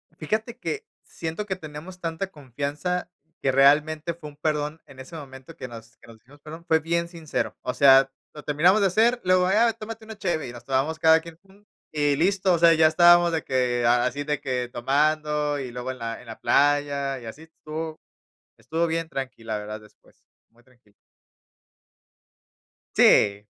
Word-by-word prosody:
Fíjate 220 +9 -3
que 430 - -4 0.2
siento 165 +5 -6
que 190 - -3
tenemos 165 +2 -10
tanta 165 +3 -3
confianza 145 +6 -4 0.3
que 135 - +1
realmente 150 +4 +3
fue 155 -2 -10
un 145 - -18
perdón, 150 0 -2
en 135 -2 -15
ese 145 +6 -10
momento 135 +1 -11
que 130 - -7
nos 115 -1 -12
que - - -20
nos 115 -1 -14
dijimos 130 +6 -21
perdón, 160 +3 -10
fue 160 0 +4
bien 170 +2 -1
sincero, 165 -3 -4
o 125 - -3
sea, 135 -1 +6 0.2
lo 150 - -10
terminamos 175 +8 +3
de 195 - +4
hacer, 230 +6 +2
luego, 185 0 +3
"Ah, 225 +4 +3
tómate 220 +1 -9
una 220 -1 -10
cheve", 170 -8 -2
y - - -7
nos 120 - -11
tomamos 135 +4 0
cada 160 0 +6
quien 165 0 -12
un 195 +1 -22 0.3
y 145 -2 +1
listo, 190 +2 +2
o 170 - +1
sea, 170 -1 +6
ya 160 -1 +5
estábamos 175 +1 +6
de 160 -3 -2
que, 125 -2 0
así 125 +4 +2
de 150 -1 -2
que 125 -2 -2
tomando 150 +3 0
y 130 -3 -6
luego 125 +1 -5
en 130 - -10
la 115 0 -5
en 125 - -17
la 110 - -9
playa 140 -1 +1
y 120 - -12
así, 130 +8 -9
estuvo 160 0 -7 0.6
estuvo 165 +2 -1
bien 165 0 -2
tranqui 130 -6 -6
la 110 -1 -3
verdad 105 +1 -7
después, 105 0 -23 0.3
muy 120 +1 -26
tranqui. 120 -4 -28 2.0
Sí, 100 0 +4
150 Hz, 185 wpm, -24 LUFS, 130-170 Hz, 2.0 s, sea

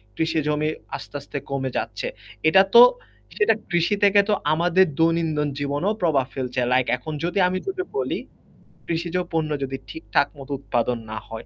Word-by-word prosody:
কৃষি 160 0 0
জমি 150 +1 +1 0.3
আস্তে, - - -9
আস্তে 140 - -7
কমে 135 -1 -2
যাচ্ছে। - - -3 0.4
এটা 190 +3 +7
তো 475 - +12 0.6
সেটা 425 - +4 0.2
কৃষি 175 +4 +2
থেকে 200 0 +6
তো - - +4 0.2
আমাদের 175 +3 +4
দৈনন্দিন 165 -3 +2
জীবনেও 145 +9 0
প্রভাব 150 -7 +2
ফেলছে। 130 -1 -3
লাইক 130 -1 +2
এখন 155 +5 -7
যদি 175 +3 -1
আমি 185 +1 -1
তোকে 375 -1 -2
বলি - - -1 0.7
কৃষিজ 170 +1 -2 0.2
পণ্য 160 -2 0
যদি 135 0 -3
ঠিকঠাক 160 - 0
মত 135 +1 -11
উৎপাদন 120 -2 -1
না 110 - -4
হয় 110 0 -7
160 Hz, 160 wpm, -23 LUFS, 140-175 Hz, 0.7 s, তো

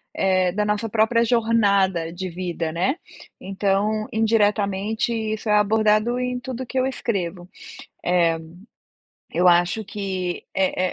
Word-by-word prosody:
eh, 185 -2 +2
da 210 +3 -1
nossa 210 +2 -1
própria 225 +2 +2
jornada 200 -7 +2
de 185 +1 -5
vida, 175 -2 -4
né. 185 - 0 0.4
Então, 200 +2 0
indiretamente 215 -1 +1
isso 220 -1 -3
é - - +4
abordado 215 +3 +3
em 250 0 -2
tudo 250 0 -6
o - - -8
que 265 - -5
eu 255 - +2
escrevo. 185 -9 -3 0.6
Eh, 170 -2 +2 0.9
eu 180 +2 +2
acho 175 +5 +3
que 190 -3 -4
é 185 -1 0
205 Hz, 130 wpm, -23 LUFS, 185-225 Hz, 0.9 s, é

